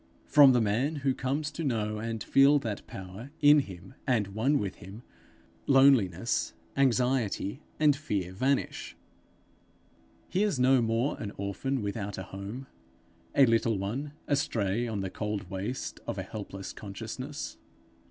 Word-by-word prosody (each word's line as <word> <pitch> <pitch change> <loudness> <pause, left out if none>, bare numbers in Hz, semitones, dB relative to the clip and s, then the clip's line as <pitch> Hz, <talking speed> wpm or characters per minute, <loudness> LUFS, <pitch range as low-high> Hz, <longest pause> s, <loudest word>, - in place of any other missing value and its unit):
From 145 -3 +7
the 120 - +3
man 115 +9 +1
who 135 - +3
comes 140 +4 -2
to 165 - -5
know 110 -6 -1
and 115 -1 -3
feel 140 +2 +5
that 110 -7 -4
Power 95 +6 -8
in 150 0 +7
him 95 -6 -7
and 110 -6 +2
one 115 +9 +1
with 100 -7 -3
him, 100 +6 -11 0.6
loneliness, 125 -8 +4 0.2
anxiety, 125 -3 +1 0.2
and 150 -2 +5
fear 100 - -3
vanish; 130 +8 -1 1.3
he 185 - 0
is 205 -10 +1
no 130 0 +5
more 115 +4 0
an 105 -3 -4
orphan 105 +6 -2
without 100 0 -4
a 95 - -4
home, 100 +8 -7 0.7
a 140 - +7
little 115 -2 +2
one 125 +10 -3
astray 120 -6 0
on 105 -3 -2
the 95 -1 -4
cold 105 -4 -4
waste 100 +7 -4
of - - -3
a - - -2
helpless 100 -2 -7
consciousness. 110 +8 -6
115 Hz, 145 wpm, -29 LUFS, 100-135 Hz, 1.3 s, From